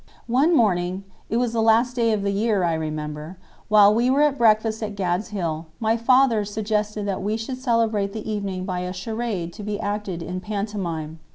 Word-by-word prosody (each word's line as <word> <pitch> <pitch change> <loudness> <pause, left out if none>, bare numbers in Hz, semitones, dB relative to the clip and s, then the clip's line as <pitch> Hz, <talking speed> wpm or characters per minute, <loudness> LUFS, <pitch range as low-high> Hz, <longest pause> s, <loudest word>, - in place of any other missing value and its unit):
One 275 +8 +3
morning—it 195 - -1
was 240 -1 0
the 230 - +1
last 230 +3 +3
day 230 -2 +2
of 210 -2 0
the 200 - 0
year, 205 -1 +1
I 170 -1 +1
remember—while 160 +7 +1
we 240 +3 +2
were 280 +3 +4
at 295 -2 +3
breakfast 220 -1 +3
at 210 -2 -4
"Gad's 185 +1 -1
Hill," 170 -6 -3
my 225 -1 +2
father 235 -1 +4
suggested 210 0 -2
that 195 -1 -2
we 210 +3 -1
should 255 +3 -5
celebrate 225 -5 +1
the 220 +1 -6
evening 200 -4 -3
by 185 -1 -2
a 180 0 -4
charade 195 -3 -4
to - - -9
be 210 0 -3
acted 205 -4 -3
in 180 +2 -4
pantomime. 185 -6 -4
210 Hz, 185 wpm, -23 LUFS, 185-225 Hz, -, were